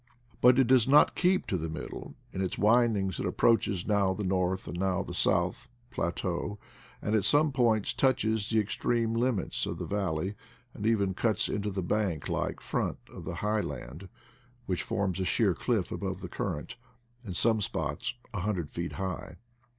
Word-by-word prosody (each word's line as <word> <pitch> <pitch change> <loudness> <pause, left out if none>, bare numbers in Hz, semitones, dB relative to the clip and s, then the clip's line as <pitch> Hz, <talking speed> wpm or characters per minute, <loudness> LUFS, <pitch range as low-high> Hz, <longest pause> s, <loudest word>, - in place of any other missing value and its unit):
But 125 +1 +7
it 135 - +5
does 125 -1 +4
not 145 +2 +6
keep 185 +1 +2
to 95 - -1
the 80 +1 -3
middle; 80 - -7 0.2
in 95 - -2
its 95 - -2
windings 105 -4 +3
it - - -1
approaches 100 -5 +2
now 100 -3 +2
the 105 - -3
north, 95 0 0
now 95 +2 0
the - - -7
south, - - +1 0.2
plateau, 85 +3 -2 0.5
and 105 - -1
at 110 -3 +3
some 145 +8 +4
points 115 -6 +2
touches 110 -6 +1
the 110 - +3
extreme 115 +2 0
limits 115 -3 0
of - - -4
the - - -4
valley, 95 -2 -1 0.4
and 105 - -3
even 100 -4 +2
cuts 105 +1 +1
into 105 0 -2
the 95 -2 -3
bank 90 -5 -1
like - - -2
front - - -2 0.2
of - - -9
the - - -4
high 105 0 +2
land, 85 +2 -7 0.6
which 90 -4 -1
forms 95 -2 -1
a - - +1
sheer 90 - +2
cliff - - -1
above - - -4
the - - -5
current, 75 - -4 0.5
in 95 -6 -6
some 110 +2 +3
spots 105 - -2 0.2
a 105 - -2
hundred 90 -5 -2
feet 85 0 -4
high. 90 -2 -4
100 Hz, 175 wpm, -29 LUFS, 95-115 Hz, 0.6 s, But